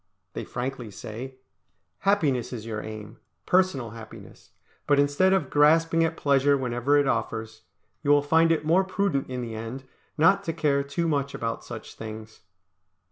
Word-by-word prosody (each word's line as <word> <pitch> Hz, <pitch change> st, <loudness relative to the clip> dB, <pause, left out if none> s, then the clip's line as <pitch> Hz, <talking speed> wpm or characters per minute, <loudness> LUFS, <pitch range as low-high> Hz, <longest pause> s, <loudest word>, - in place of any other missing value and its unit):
They -, -, -5 dB
frankly 125 Hz, -2 st, -5 dB
say, 115 Hz, +6 st, -8 dB, 0.6 s
"Happiness 155 Hz, -, +1 dB
is 115 Hz, -3 st, -6 dB
your 110 Hz, -2 st, -4 dB
aim, 110 Hz, +1 st, -9 dB, 0.3 s
personal 180 Hz, -, +2 dB
happiness; 115 Hz, -1 st, -12 dB, 0.4 s
but 145 Hz, -, +4 dB
instead 145 Hz, +7 st, +3 dB
of 190 Hz, -1 st, +1 dB
grasping 165 Hz, +3 st, +4 dB
at 165 Hz, 0 st, -1 dB
pleasure 140 Hz, 0 st, +3 dB
whenever 125 Hz, +2 st, +1 dB
it 145 Hz, -, +3 dB
offers, 110 Hz, -3 st, -2 dB, 0.4 s
you 145 Hz, -, -2 dB
will 145 Hz, 0 st, +5 dB
find 160 Hz, +3 st, +4 dB
it 155 Hz, -2 st, 0 dB
more 175 Hz, +5 st, +4 dB
prudent 190 Hz, -8 st, -1 dB
in 125 Hz, -1 st, -4 dB
the 115 Hz, -1 st, -6 dB
end 115 Hz, +4 st, -6 dB, 0.3 s
not 165 Hz, +6 st, +4 dB
to 165 Hz, -, -2 dB
care 150 Hz, -3 st, +1 dB
too 140 Hz, +5 st, -2 dB
much 140 Hz, -3 st, -1 dB
about 115 Hz, 0 st, -3 dB
such 110 Hz, -3 st, -9 dB
things." 110 Hz, 0 st, -9 dB
140 Hz, 160 wpm, -26 LUFS, 115-160 Hz, 0.6 s, will